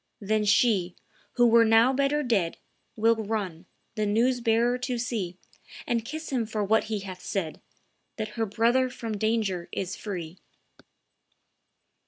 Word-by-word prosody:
Then 210 Hz, +1 st, 0 dB
she, 200 Hz, -4 st, +3 dB, 0.4 s
who 240 Hz, -, +4 dB
were 230 Hz, 0 st, +6 dB
now 225 Hz, +3 st, +5 dB
better 280 Hz, +2 st, +1 dB
dead, 200 Hz, -10 st, 0 dB, 0.4 s
Will 225 Hz, +1 st, +3 dB
run, 200 Hz, -6 st, -4 dB, 0.3 s
the 215 Hz, -2 st, -1 dB
news 240 Hz, +4 st, +2 dB
bearer 235 Hz, +2 st, +2 dB
to 250 Hz, -1 st, -2 dB
see, 215 Hz, -7 st, -3 dB, 0.5 s
And 235 Hz, -2 st, 0 dB
kiss 310 Hz, +6 st, -6 dB
him 240 Hz, -4 st, 0 dB
for 215 Hz, -1 st, -2 dB
what 220 Hz, +2 st, +2 dB
he 215 Hz, -2 st, -3 dB
hath 185 Hz, -2 st, -8 dB
said, 170 Hz, -6 st, -3 dB, 0.6 s
That 215 Hz, -1 st, -3 dB
her 225 Hz, +1 st, -2 dB
brother 235 Hz, +5 st, +2 dB
from 230 Hz, -3 st, -5 dB
danger 210 Hz, -5 st, 0 dB
is 190 Hz, 0 st, -3 dB
free." 180 Hz, -4 st, -6 dB
220 Hz, 145 wpm, -27 LUFS, 200-235 Hz, 0.6 s, were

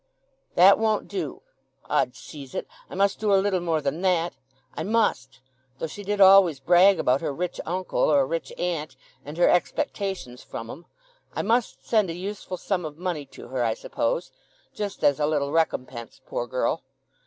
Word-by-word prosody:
"That 190 Hz, +4 st, +7 dB
won't 220 Hz, -1 st, +1 dB
do. 380 Hz, -, -5 dB, 0.4 s
'Od -, -, +1 dB
seize 140 Hz, -4 st, -11 dB
it, -, -, -2 dB, 0.2 s
I -, -, -8 dB
must 200 Hz, 0 st, +1 dB
do 210 Hz, -1 st, +1 dB
a 195 Hz, -, +6 dB
little 190 Hz, -1 st, +1 dB
more 165 Hz, -3 st, 0 dB
than 145 Hz, +4 st, -2 dB
that! 175 Hz, -3 st, +1 dB, 0.4 s
I -, -, -5 dB
must—though 130 Hz, -, -2 dB
she 205 Hz, +6 st, -8 dB
did 205 Hz, +1 st, -2 dB
always 190 Hz, -6 st, +7 dB
brag 180 Hz, +6 st, +5 dB
about 130 Hz, +2 st, +2 dB
her -, -, -2 dB
rich 175 Hz, +5 st, -4 dB
uncle 185 Hz, +2 st, -2 dB
or 145 Hz, -3 st, +4 dB
rich 165 Hz, +4 st, -4 dB
aunt, 165 Hz, -4 st, -3 dB, 0.3 s
and 150 Hz, +3 st, -9 dB
her 175 Hz, -, +5 dB
expectations 190 Hz, -, -1 dB
from 115 Hz, 0 st, -7 dB
'em—I -, -, -10 dB
must 230 Hz, +3 st, 0 dB
send 215 Hz, -5 st, +2 dB
a -, -, -3 dB
useful 190 Hz, 0 st, -5 dB
sum 185 Hz, 0 st, -2 dB
of 155 Hz, -1 st, -7 dB
money 170 Hz, -5 st, -3 dB
to -, -, -12 dB
her, 130 Hz, -1 st, -1 dB
I 115 Hz, -1 st, +1 dB
suppose—just 205 Hz, -2 st, -5 dB
as 145 Hz, 0 st, +4 dB
a 150 Hz, -, +2 dB
little 145 Hz, -2 st, 0 dB
recompense, 130 Hz, -7 st, -2 dB
poor 120 Hz, -, -3 dB
girl.... 130 Hz, +5 st, -1 dB
170 Hz, 170 wpm, -25 LUFS, 140-195 Hz, 0.4 s, That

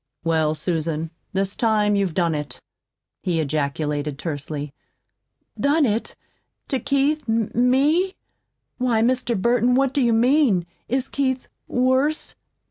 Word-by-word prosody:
"Well, 160 Hz, -2 st, +1 dB
Susan, 160 Hz, -1 st, -2 dB, 0.2 s
this 195 Hz, 0 st, -1 dB
time 210 Hz, -3 st, +2 dB
you've 195 Hz, -5 st, 0 dB
done 170 Hz, -3 st, +2 dB
it," 150 Hz, -4 st, -5 dB, 0.6 s
he 170 Hz, -3 st, 0 dB
ejaculated 145 Hz, -1 st, -2 dB
tersely. 145 Hz, -2 st, -5 dB, 0.9 s
"Done 290 Hz, +2 st, +3 dB
it 220 Hz, -1 st, -1 dB, 0.5 s
to 265 Hz, -, 0 dB
Keith 280 Hz, +2 st, 0 dB
ME? 260 Hz, -, +2 dB, 0.6 s
Why, 240 Hz, -3 st, +2 dB
Mr. 245 Hz, -3 st, +1 dB
Burton, 240 Hz, +3 st, +3 dB
what 270 Hz, 0 st, +2 dB
do 280 Hz, -, +1 dB
you 235 Hz, -2 st, +3 dB
mean? 235 Hz, -, +3 dB, 0.2 s
Is 260 Hz, +2 st, 0 dB
Keith 260 Hz, -2 st, -1 dB, 0.2 s
worse?" 260 Hz, +5 st, +1 dB
225 Hz, 120 wpm, -22 LUFS, 160-260 Hz, 0.9 s, Done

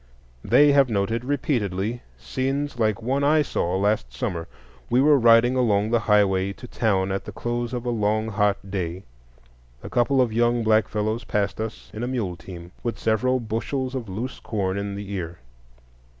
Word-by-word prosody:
They 145 Hz, 0 st, +5 dB
have 140 Hz, -2 st, +4 dB
noted 110 Hz, +2 st, -1 dB
repeatedly 120 Hz, -, -1 dB, 0.2 s
scenes 135 Hz, 0 st, -3 dB
like 110 Hz, 0 st, +1 dB
one 135 Hz, +4 st, 0 dB
I 150 Hz, +1 st, +4 dB
saw 90 Hz, -8 st, -1 dB
last 100 Hz, -, 0 dB
summer. 85 Hz, +7 st, -4 dB, 0.4 s
We 120 Hz, -, +3 dB
were 145 Hz, +1 st, +5 dB
riding 120 Hz, +1 st, +5 dB
along 110 Hz, -4 st, +2 dB
the 120 Hz, -, +3 dB
highroad 100 Hz, -3 st, +2 dB
to 125 Hz, -, -10 dB
town 100 Hz, -5 st, 0 dB
at 95 Hz, -, -3 dB
the -, -, -6 dB
close 120 Hz, 0 st, -3 dB
of 125 Hz, -1 st, -4 dB
a 120 Hz, -, 0 dB
long 110 Hz, 0 st, 0 dB
hot 100 Hz, -2 st, 0 dB
day. 90 Hz, -1 st, -3 dB, 0.8 s
A -, -, -8 dB
couple 130 Hz, +3 st, +2 dB
of 120 Hz, -4 st, +2 dB
young 120 Hz, +1 st, +2 dB
black 110 Hz, 0 st, +3 dB
fellows 110 Hz, +2 st, -2 dB
passed 105 Hz, -1 st, -1 dB
us 110 Hz, 0 st, -6 dB
in 110 Hz, -, -6 dB
a 120 Hz, -, -2 dB
muleteam, 90 Hz, -7 st, -5 dB
with 120 Hz, -, -3 dB
several 125 Hz, +4 st, +1 dB
bushels 125 Hz, +4 st, -3 dB
of 125 Hz, -6 st, -4 dB
loose 115 Hz, +7 st, -5 dB
corn 95 Hz, -4 st, -2 dB
in 100 Hz, 0 st, -3 dB
the 100 Hz, 0 st, -7 dB
ear. 90 Hz, -3 st, -4 dB
110 Hz, 175 wpm, -24 LUFS, 100-125 Hz, 0.8 s, They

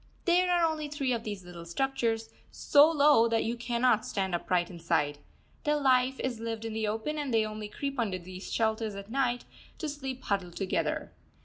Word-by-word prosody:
There 360 Hz, 0 st, +4 dB
are 350 Hz, -1 st, +4 dB
only 310 Hz, -2 st, -1 dB
three 280 Hz, -3 st, -1 dB
of 230 Hz, -1 st, -2 dB
these 205 Hz, -4 st, -6 dB
little 175 Hz, -1 st, -9 dB
structures, 225 Hz, +3 st, -1 dB, 0.2 s
so 290 Hz, +2 st, +5 dB
low 290 Hz, -7 st, +5 dB
that 230 Hz, -1 st, +1 dB
you 230 Hz, +2 st, -1 dB
cannot 240 Hz, -1 st, +2 dB
stand 190 Hz, -2 st, -2 dB
upright 175 Hz, +1 st, 0 dB
inside. 165 Hz, -4 st, 0 dB, 0.4 s
Their 300 Hz, -1 st, +2 dB
life 260 Hz, -1 st, +3 dB
is 250 Hz, -3 st, -2 dB
lived 225 Hz, 0 st, -4 dB
in 225 Hz, -, -4 dB
the 220 Hz, -1 st, -1 dB
open, 225 Hz, +9 st, -2 dB
and 285 Hz, -3 st, -2 dB
they 225 Hz, -1 st, +3 dB
only 215 Hz, 0 st, -5 dB
creep 275 Hz, +5 st, -4 dB
under 205 Hz, -6 st, 0 dB
these 185 Hz, +1 st, -9 dB
shelters 220 Hz, -2 st, 0 dB
at 200 Hz, +2 st, -8 dB
night, 245 Hz, -2 st, 0 dB, 0.3 s
to 315 Hz, -, -3 dB
sleep 270 Hz, -3 st, -5 dB
huddled 190 Hz, -4 st, -2 dB
together. 195 Hz, -2 st, -1 dB
230 Hz, 190 wpm, -30 LUFS, 200-270 Hz, 0.4 s, so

